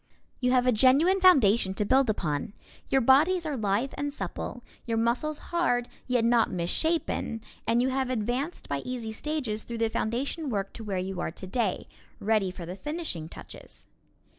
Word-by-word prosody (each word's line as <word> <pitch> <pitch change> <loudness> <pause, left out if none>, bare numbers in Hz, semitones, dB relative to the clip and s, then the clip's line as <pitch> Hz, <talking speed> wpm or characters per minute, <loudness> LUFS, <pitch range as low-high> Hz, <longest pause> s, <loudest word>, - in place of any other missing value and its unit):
You 250 - +1
have 255 -1 +3
a 250 - +5
genuine 280 - +4
foundation 230 - +5
to 210 - 0
build 265 +2 +3
upon. 170 0 -2 0.4
Your 270 - +3
bodies 315 +8 +4
are 300 -2 -2
lithe 220 +3 0
and 290 0 -2
supple, 240 +1 -5 0.2
your 230 -1 0
muscles 245 +7 0 0.2
hard 245 -9 +2 0.2
yet 245 -2 +2
not 235 -1 +4
misshapen, 225 - -1 0.3
and 235 +2 +3
you 260 - +2
have 265 -1 -1
advanced 255 +7 -2
by 140 - -1
easy 240 - -5
stages 245 -3 -3
through 235 - -6
the 225 0 +1
foundation 270 +8 -2
work 200 -4 -2
to 225 - -8
where 200 -3 -3
you 185 0 -3
are - - -1
today, 190 +4 -2 0.3
ready 210 -2 +1
for 180 -1 -7
the 180 +2 -6
finishing 295 - -5
touches. - - -12
235 Hz, 170 wpm, -28 LUFS, 205-275 Hz, 0.4 s, a